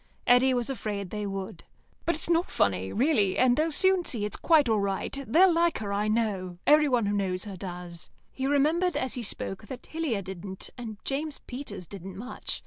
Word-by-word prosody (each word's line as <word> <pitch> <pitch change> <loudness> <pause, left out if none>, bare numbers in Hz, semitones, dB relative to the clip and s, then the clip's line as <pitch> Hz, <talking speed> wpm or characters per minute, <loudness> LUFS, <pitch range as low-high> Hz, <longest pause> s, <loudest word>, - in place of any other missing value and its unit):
Eddy 245 +2 +5
was 245 -2 +1
afraid 205 -7 -4
they 210 -1 -3
would. 195 -2 -5 0.4
"But 340 - +2
it's 315 - -2
not 340 +1 +2
funny, 95 -1 +1
really, 225 -7 +2
and 250 -1 +4
they'll 315 +3 +1
soon 375 +3 +3
see 225 -10 0
it's 210 - -2
quite 315 -5 +4
all 220 -2 +2
right. 195 -1 -2
They'll 350 - +6
like 335 0 +2
her, 205 -2 -3
I 205 +1 0
know. 205 -5 -1
Everyone 290 -7 +5
who 205 0 0
knows 185 -2 -1
her 200 -2 -6
does." 175 -3 -7 0.2
He 265 0 -2
remembered 310 +6 +2
as 260 - -1
he 250 - -3
spoke 210 -1 -4
that 250 +3 -8
Hillier 300 -11 -2
didn't, 190 +1 -7
and 225 -4 -7
James 290 +2 -2
Peters 245 -8 -7
didn't 190 0 -8
much. 245 +5 -5
220 Hz, 195 wpm, -28 LUFS, 195-285 Hz, 0.4 s, They'll